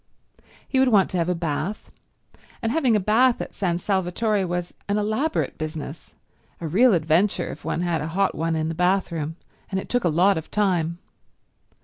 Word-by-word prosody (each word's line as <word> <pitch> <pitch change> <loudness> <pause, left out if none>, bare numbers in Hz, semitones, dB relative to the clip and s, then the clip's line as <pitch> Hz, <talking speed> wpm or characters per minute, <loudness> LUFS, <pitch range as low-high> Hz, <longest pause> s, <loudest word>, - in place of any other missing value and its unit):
He 265 - +1
would 265 - +5
want 205 -6 +4
to 185 - -1
have 170 +1 0
a 180 - +1
bath, 165 +4 -3 0.7
and 225 - +1
having 265 -7 +2
a - - +3
bath 230 +5 +3
at - - -6
San 175 -4 -1
Salvatore 195 +2 0
was 175 0 -3 0.2
an 205 - +2
elaborate 220 +10 -1
business, 155 0 -6 0.4
a 165 - -4
real 215 +7 +5
adventure 170 +3 +1
if - - -10
one 170 - -2
had 170 -3 0
a 150 - -3
hot 190 +4 +1
one 165 +1 -1
in 155 0 -1
the 165 - -2
bathroom, 170 -3 0 0.3
and 190 - -1
it - - -8
took 245 0 +1
a 175 - +3
lot 180 +3 +3
of 160 - -11
time. 175 -5 0
180 Hz, 190 wpm, -24 LUFS, 165-210 Hz, 0.7 s, would